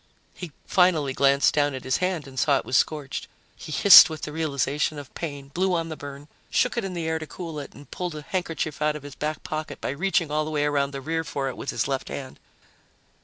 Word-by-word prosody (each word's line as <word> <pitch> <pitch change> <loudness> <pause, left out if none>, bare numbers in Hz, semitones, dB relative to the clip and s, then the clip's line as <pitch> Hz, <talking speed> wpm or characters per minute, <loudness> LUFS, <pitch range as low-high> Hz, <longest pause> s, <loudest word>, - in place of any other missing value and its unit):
He 180 -4 -8
finally 165 -7 +3
glanced 140 +1 +3
down 145 -2 +1
at 130 - -7
his 130 0 +1
hand 180 -5 -2
and 130 -1 -6
saw 140 0 +3
it - - -5
was 130 - -2
scorched. 145 0 0 0.3
He - - -10
hissed 185 +4 +9
with 155 -1 -7
the 150 - -4
realization 150 -1 -1
of 145 -2 -9
pain, 140 -4 -6
blew 185 +5 0
on 165 -1 -2
the 155 - -5
burn, 145 0 -9 0.2
shook 250 - +1
it 235 - -1
in 190 -2 -4
the 165 -2 -3
air 160 0 0
to 155 - -7
cool 165 -3 -6
it, 140 - -9
and 145 - -14
pulled 180 -3 -4
a 150 - -7
handkerchief 165 -4 -3
out 150 0 +1
of 150 - -8
his 145 -1 -9
back 150 +2 -4
pocket 155 0 -5
by - - -3
reaching 165 +1 0
all 155 +1 +1
the 155 - -5
way 150 -1 0
around 140 -1 +1
the 140 -1 -7
rear 160 +3 -2
for 135 -3 -3
it 130 - -7
with - - -6
his 115 - -1
left 135 -1 -3
hand. 130 -2 -7
150 Hz, 245 wpm, -25 LUFS, 140-165 Hz, 0.3 s, hissed